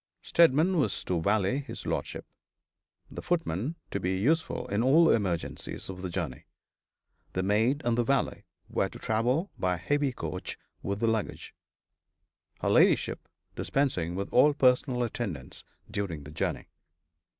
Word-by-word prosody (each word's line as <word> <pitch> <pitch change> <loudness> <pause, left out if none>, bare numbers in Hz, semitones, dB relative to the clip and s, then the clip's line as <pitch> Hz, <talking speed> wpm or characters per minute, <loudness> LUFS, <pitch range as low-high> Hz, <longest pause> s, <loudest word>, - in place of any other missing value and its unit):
Steadman 170 +2 +4
was 145 - 0
to 90 -3 -1
valet 100 - +2
his 140 - -8
lordship, - - -3 0.9
the - - -6
footman 155 - -1 0.2
to 100 - -1
be 95 0 -1
useful 160 +11 +1
in 100 +2 +1
all 155 +7 +6
emergencies 95 -2 -2
of 90 -1 -9
the 95 - -3
journey. 85 -8 -4 0.9
The 95 - -1
maid 110 +8 +2
and 120 -1 +2
the 120 - +2
valet 135 +2 0 0.2
were - - 0
to - - -11
travel 125 - 0
by 90 -1 +1
heavy 145 - 0
coach, - - -5 0.2
with 100 +2 -3
the 115 - +2
luggage 110 -2 -2 1.1
her - - +1
ladyship - - +3 0.3
dispensing 90 - 0
with 100 +1 -3
all 145 +3 +6
personal 125 -1 +3
attendance 100 - -5 0.3
during 85 -8 -3
the 75 - -10
journey. 75 - -2
115 Hz, 140 wpm, -29 LUFS, 95-140 Hz, 1.1 s, all